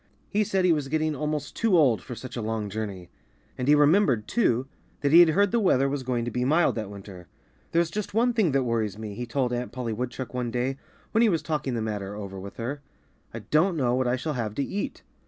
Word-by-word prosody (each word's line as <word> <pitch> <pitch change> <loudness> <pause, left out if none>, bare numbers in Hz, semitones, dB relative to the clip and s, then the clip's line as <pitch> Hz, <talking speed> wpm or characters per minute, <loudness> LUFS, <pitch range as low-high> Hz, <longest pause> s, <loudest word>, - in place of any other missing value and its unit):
He 215 +1 +2
said 190 -2 +1
he 175 - +5
was 150 -3 -2
getting 155 +1 0
almost 150 0 -3
too 220 -6 +3
old 130 -9 +4
for 125 - -8
such 125 +3 -8
a 120 - -3
long 110 -2 -3
journey. 100 -4 -5 0.4
And 125 - -3
he 150 - +7
remembered, 145 - +3
too, 130 - +1 0.4
that 140 - +1
he 165 - +9
had 175 -2 +8
heard 200 +4 +3
the 235 - +2
weather 140 - +3
was 140 0 -2
going 125 -2 -1
to 120 - -3
be 125 +2 -1
mild 155 +6 +3
that 110 -3 -4
winter. 95 -3 -10 0.4
"There's 170 0 +2
just 210 +1 -3
one 240 +3 +2
thing 215 -9 +2
that 135 -1 +2
worries 110 -4 -1
me," 110 -2 -6
he 120 +4 -5
told 125 0 0
Aunt 125 0 -3
Polly 125 -3 -3
Woodchuck 125 +2 -5
one 125 -1 -2
day, 125 +3 -1 0.3
when 220 - +3
he 235 - +5
was 165 -5 0
talking 145 -5 -2
the 115 - -1
matter 105 -2 -4
over 100 -2 -7
with 100 +2 -9
her. 130 +5 -4 0.5
"I - - -7
don't 170 +3 +3
know 125 -4 +1
what 130 0 +1
I 120 - +2
shall 150 +4 -3
have 110 -5 -3
to 140 - 0
eat." 200 +8 -4
130 Hz, 245 wpm, -26 LUFS, 115-155 Hz, 0.5 s, he